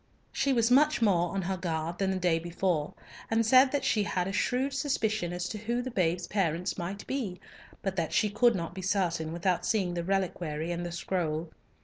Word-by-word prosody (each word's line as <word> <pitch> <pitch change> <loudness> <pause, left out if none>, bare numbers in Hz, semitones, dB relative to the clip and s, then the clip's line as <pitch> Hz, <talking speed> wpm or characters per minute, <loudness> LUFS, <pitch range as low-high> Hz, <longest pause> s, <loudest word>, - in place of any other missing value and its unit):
She 275 - +1
was 235 -2 +2
much 300 +4 +5
more 175 -6 +2
on 195 - -1
her 190 +1 -2
guard 165 -1 -3
than 195 -1 +1
the 190 - 0
day 175 -3 +2
before, 170 -2 -1 0.3
and 225 0 +2
said 260 +3 +6
that 280 -2 -1
she 215 - +2
had 180 -1 -1
a 195 - -3
shrewd 255 +6 0
suspicion 220 - 0
as 175 0 -3
to 215 - -5
who 235 +3 -1
the 255 - -5
babe's 175 -4 0
parents 180 -4 -1
might 195 +3 -5
be, 215 -10 -3 0.4
but 195 -2 -2
that 165 -3 -1
she 215 - +3
could 235 +2 +4
not 170 -2 -4
be 190 - -6
certain 175 -4 0
without 175 +2 0
seeing 190 -6 0
the 170 -1 -2
reliquary 175 -4 -1
and 175 0 -3
the 175 - -4
scroll. 170 -2 -2
185 Hz, 210 wpm, -29 LUFS, 170-220 Hz, 0.4 s, said